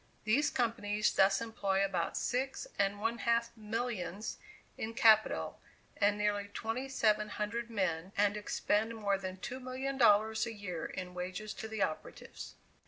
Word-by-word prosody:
These 275 +8 +3
companies 225 -5 +1
thus 195 +1 +4
employ 195 -4 0
about 180 -4 -1
six 265 - -1
and 200 +1 +2
one 225 +2 -1
half 235 0 +1
millions 215 -3 -3 0.4
in 225 +1 -5
capital, 220 -2 +4 0.3
and 205 0 +3
nearly 205 -1 0
twenty 225 +6 -3
seven 215 -5 +2
hundred 230 +3 -3
men, 185 -5 -1
and 205 0 +3
expend 210 +1 0
more 200 -3 0
than 185 -1 -5
$2,000,000 250 -3 +2
a 230 - -4
year 180 -6 -5
in 180 -1 -6
wages 185 +4 -4
to 220 - -6
the 220 -2 -1
operatives. 155 - -5
215 Hz, 140 wpm, -33 LUFS, 200-230 Hz, 0.4 s, thus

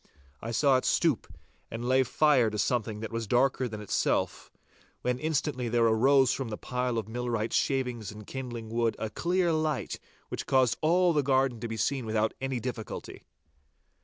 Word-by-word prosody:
I 115 - -5
saw 130 +3 +3
it 130 - -3
stoop 160 - +1 0.4
and 115 +2 -5
lay 130 +1 +4
fire 130 -2 +3
to 105 - -5
something 110 0 -1
that 110 - -5
was 115 -1 -3
darker 125 +2 +2
than 105 -2 -7
itself, 105 - -1 0.5
when 125 0 0
instantly 145 -5 -1
there 115 0 +3
arose 130 +4 +4
from 135 -4 -4
the 105 - -4
pile 125 -1 -2
of 110 -2 -2
millwright's 115 -1 -2
shavings 125 -6 -1
and 105 0 -11
kindling 120 -3 -6
wood 115 0 0
a 110 - -4
clear 175 +3 +1
light 155 -3 -1 0.3
which - - -5
caused 130 -3 +3
all 175 +2 +3
the 150 - +3
garden 130 -3 +1
to 115 - -4
be 115 0 -5
seen 125 +2 -1
without 110 0 +1
any 135 -2 -2
difficulty. 120 -2 -6
125 Hz, 175 wpm, -29 LUFS, 115-135 Hz, 0.5 s, lay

